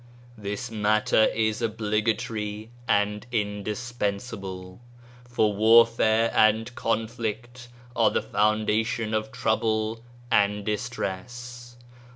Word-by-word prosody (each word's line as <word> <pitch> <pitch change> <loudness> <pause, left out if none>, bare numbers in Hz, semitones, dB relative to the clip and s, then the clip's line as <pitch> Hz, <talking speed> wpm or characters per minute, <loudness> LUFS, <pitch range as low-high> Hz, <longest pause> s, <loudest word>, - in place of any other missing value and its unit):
This 105 +3 -5
matter 110 0 +3
is 110 0 0
obligatory 110 0 -2 0.2
and 105 -1 +1
indispensable, 105 -3 -4 0.5
for 110 -3 +2
warfare 115 +1 +4
and 110 +2 +3
conflict 115 +2 -3 0.3
are - - +4
the - - -1
foundation 110 +2 0
of 110 0 -1
trouble 110 0 0 0.3
and 105 -1 +2
distress." 120 +2 -5
110 Hz, 85 wpm, -26 LUFS, 105-115 Hz, 0.5 s, warfare